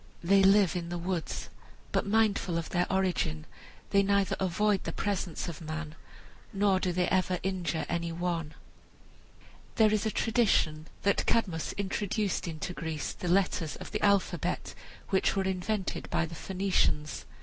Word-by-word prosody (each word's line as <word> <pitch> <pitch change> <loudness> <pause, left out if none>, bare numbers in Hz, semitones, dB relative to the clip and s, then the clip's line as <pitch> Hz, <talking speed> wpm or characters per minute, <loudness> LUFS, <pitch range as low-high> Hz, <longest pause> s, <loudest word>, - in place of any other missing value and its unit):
They 195 +3 +5
live 195 -2 +5
in 170 -1 -3
the 175 - -3
woods, 175 -1 -3 0.4
but - - 0
mindful 200 -5 +2
of 165 - -3
their 175 +1 +1
origin, 180 - 0 0.5
they 200 - +5
neither 200 0 +2
avoid 190 +2 +1
the - - -3
presence 190 -5 -2
of 170 -2 -6
man 155 0 -5 0.6
nor 195 -1 +2
do 185 - 0
they 180 0 +1
ever 185 -1 +2
injure 180 -3 -1
any 170 0 -2
one. 165 -2 -2 1.2
There 215 -1 +5
is 215 +1 +1
a - - +2
tradition 205 -10 +1 0.2
that 200 - +2
Cadmus 180 -8 0
introduced 200 0 -1
into 165 +2 -4
Greece 160 -4 -4
the 180 - -6
letters 180 -3 +1
of - - -9
the 210 - -2
alphabet 200 -2 +1 0.4
which 190 0 +2
were 195 - +1
invented 190 +1 -2
by 170 - +1
the 165 - -9
Phoenicians. 180 -4 0
185 Hz, 150 wpm, -30 LUFS, 170-200 Hz, 1.2 s, They